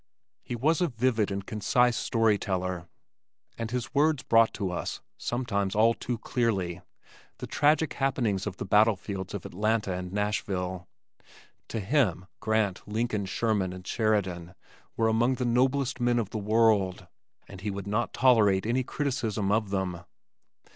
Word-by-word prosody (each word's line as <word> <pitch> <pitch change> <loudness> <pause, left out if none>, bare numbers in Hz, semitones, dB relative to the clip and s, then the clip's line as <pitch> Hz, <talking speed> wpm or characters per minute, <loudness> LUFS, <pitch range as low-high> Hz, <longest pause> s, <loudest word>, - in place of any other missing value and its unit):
He 120 - -5
was 155 +8 +1
a 175 - +3
vivid 120 -4 +1
and 100 -1 -4
concise 120 +4 +2
story 115 -4 +2
teller 90 -3 -3 0.7
and 115 -1 -4
his 125 +2 -4
words 150 0 +2
brought 115 0 +4
to 95 -3 -2
us 90 - -4 0.2
(sometimes 100 -6 -2
all 115 +2 +5
too 120 +1 -4
clearly), 100 -8 -1 0.6
the - - -6
tragic 150 +2 +2
happenings 120 -8 0
of 95 -3 -5
the - - -4
battlefields 100 -2 +1
of 100 - -6
Atlanta 105 0 0
and 90 0 -5
Nashville. 95 -3 -2 0.8
To 115 - -3
him 100 - +1
Grant, 110 -3 0
Lincoln, 105 -2 -1
Sherman 100 -3 0
and 90 0 -10
Sheridan 95 -6 -1 0.4
were 115 - +3
among 115 +3 +2
the 125 - -2
noblest 130 +2 +1
men 120 0 +2
of 110 -4 -1
the 110 - -3
world, 105 -4 +2 0.4
and 95 -1 -11
he 105 - -3
would 100 -1 -5
not 105 +4 -1
tolerate 110 -7 +4
any 120 +3 +1
criticism 115 -8 -1
of 105 -1 +1
them. 95 -3 -2
110 Hz, 150 wpm, -28 LUFS, 95-120 Hz, 0.8 s, all